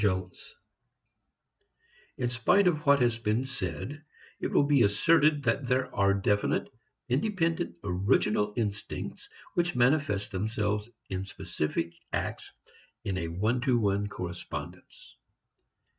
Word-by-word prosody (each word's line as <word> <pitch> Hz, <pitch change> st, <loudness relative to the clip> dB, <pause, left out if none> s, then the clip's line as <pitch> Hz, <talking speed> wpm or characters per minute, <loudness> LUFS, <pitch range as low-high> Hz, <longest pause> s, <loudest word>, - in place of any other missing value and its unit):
VI 95 Hz, -2 st, +1 dB, 1.9 s
In 120 Hz, -1 st, -1 dB
spite 180 Hz, -, +3 dB
of 155 Hz, -4 st, 0 dB
what 140 Hz, -1 st, +6 dB
has 120 Hz, -2 st, +2 dB
been 110 Hz, +2 st, +1 dB
said, 140 Hz, +2 st, -4 dB, 0.4 s
it -, -, -1 dB
will -, -, +3 dB
be 140 Hz, -2 st, +4 dB
asserted 145 Hz, +8 st, +4 dB
that 125 Hz, +2 st, 0 dB
there 130 Hz, 0 st, 0 dB
are 100 Hz, 0 st, +3 dB
definite, 100 Hz, +1 st, +1 dB, 0.4 s
independent, 165 Hz, -, 0 dB
original 105 Hz, +2 st, +2 dB
instincts 100 Hz, -4 st, -4 dB, 0.2 s
which 175 Hz, 0 st, 0 dB
manifest 125 Hz, -5 st, +2 dB
themselves 105 Hz, +2 st, -1 dB, 0.2 s
in 95 Hz, 0 st, -2 dB
specific 90 Hz, -4 st, -3 dB, 0.2 s
acts -, -, -3 dB, 0.5 s
in 95 Hz, -, -2 dB
a 85 Hz, -3 st, -2 dB
one 105 Hz, +9 st, 0 dB
to 130 Hz, -2 st, +3 dB
one 100 Hz, -2 st, +1 dB
correspondence. 90 Hz, -3 st, -7 dB
110 Hz, 115 wpm, -29 LUFS, 100-140 Hz, 1.9 s, what